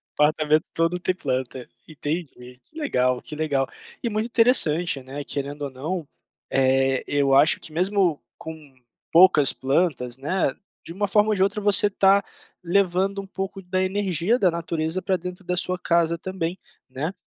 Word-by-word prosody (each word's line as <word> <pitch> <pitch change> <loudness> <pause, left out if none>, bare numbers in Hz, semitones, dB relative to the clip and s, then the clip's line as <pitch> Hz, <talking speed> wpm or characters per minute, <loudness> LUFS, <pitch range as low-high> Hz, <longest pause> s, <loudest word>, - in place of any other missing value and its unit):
Apartamento 155 +1 +2
todo 165 +2 0
tem 185 +1 -1
planta. 130 -5 -3 0.2
Entendi. 155 +2 -3 0.4
Que - - -35
legal. 125 - 0
Que 150 - -8
legal. 145 -4 0 0.4
E 235 - 0
muito 215 0 -1
interessante, 180 - +2
né, 140 +2 -7
querendo 140 +1 -4
ou 140 - -3
não, 155 +5 -4 0.4
eh, 135 0 +2
eu 140 -1 +1
acho 145 +3 +5
que - - -8
mesmo 180 -2 +1 0.2
com 155 -4 -10 0.4
poucas 165 -5 +6
plantas, 135 -3 -1
né, 145 +1 -1 0.3
de 165 - -7
uma 205 +2 -1
forma 210 +2 +3
ou 215 - +2
de 190 - +2
outra 200 +2 0
você 205 0 +3
tá 195 0 +4 0.4
levando 195 +2 +1
um 195 - -12
pouco 195 0 -5
da 185 +1 -2
energia 190 +2 0
da 185 -6 +3
natureza 165 +1 -3
pra 190 0 0
dentro 180 +1 -8
da 180 +1 -2
sua 180 +1 -1
casa 170 -1 +1
também, 185 0 -4 0.3
né. 145 +7 -4
170 Hz, 165 wpm, -24 LUFS, 145-190 Hz, 0.4 s, poucas